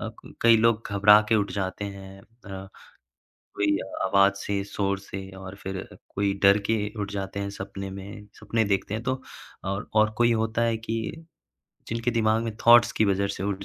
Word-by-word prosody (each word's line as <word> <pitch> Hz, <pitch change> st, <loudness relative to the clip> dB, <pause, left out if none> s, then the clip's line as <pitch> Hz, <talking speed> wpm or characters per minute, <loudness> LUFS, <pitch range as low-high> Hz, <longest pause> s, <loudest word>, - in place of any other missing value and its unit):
अ, -, -, -4 dB
क -, -, -14 dB
कई 115 Hz, -1 st, +7 dB
लोग 115 Hz, 0 st, +3 dB
घबरा 105 Hz, +1 st, +7 dB
के 115 Hz, -, +3 dB
उठ 100 Hz, -1 st, 0 dB
जाते 100 Hz, +1 st, -3 dB
हैं 95 Hz, -1 st, -9 dB
अ, 100 Hz, -3 st, -11 dB, 0.9 s
कोई 100 Hz, -1 st, +2 dB, 0.3 s
आवाज़ 100 Hz, 0 st, +4 dB
से, 100 Hz, 0 st, -2 dB
शोर 100 Hz, -1 st, -2 dB
से 95 Hz, -1 st, -8 dB
और 95 Hz, 0 st, -9 dB
फिर 95 Hz, -1 st, -6 dB, 0.3 s
कोई 100 Hz, 0 st, +1 dB
डर 100 Hz, +1 st, +7 dB
के 115 Hz, -, +4 dB, 0.3 s
उठ 100 Hz, 0 st, -4 dB
जाते 100 Hz, 0 st, -4 dB
हैं 100 Hz, 0 st, -3 dB
सपने 100 Hz, 0 st, -7 dB
में, 100 Hz, +2 st, -9 dB
सपने 110 Hz, +2 st, 0 dB
देखते 100 Hz, +1 st, -1 dB
हैं 110 Hz, +1 st, -3 dB
तो। 130 Hz, 0 st, -2 dB, 0.4 s
और 100 Hz, +1 st, -3 dB
और 110 Hz, 0 st, +5 dB
कोई 120 Hz, 0 st, +4 dB
होता 110 Hz, +1 st, 0 dB
है 115 Hz, -1 st, +1 dB
कि 115 Hz, +8 st, -5 dB, 0.6 s
जिनके 115 Hz, +1 st, -1 dB
दिमाग 110 Hz, -1 st, +2 dB
में 115 Hz, -, -3 dB
थॉट्स 120 Hz, 0 st, +7 dB
की 110 Hz, -, +2 dB
वजह 100 Hz, 0 st, +1 dB
से 95 Hz, -1 st, -5 dB
उठ 100 Hz, -1 st, -3 dB
100 Hz, 190 wpm, -26 LUFS, 100-115 Hz, 0.9 s, कई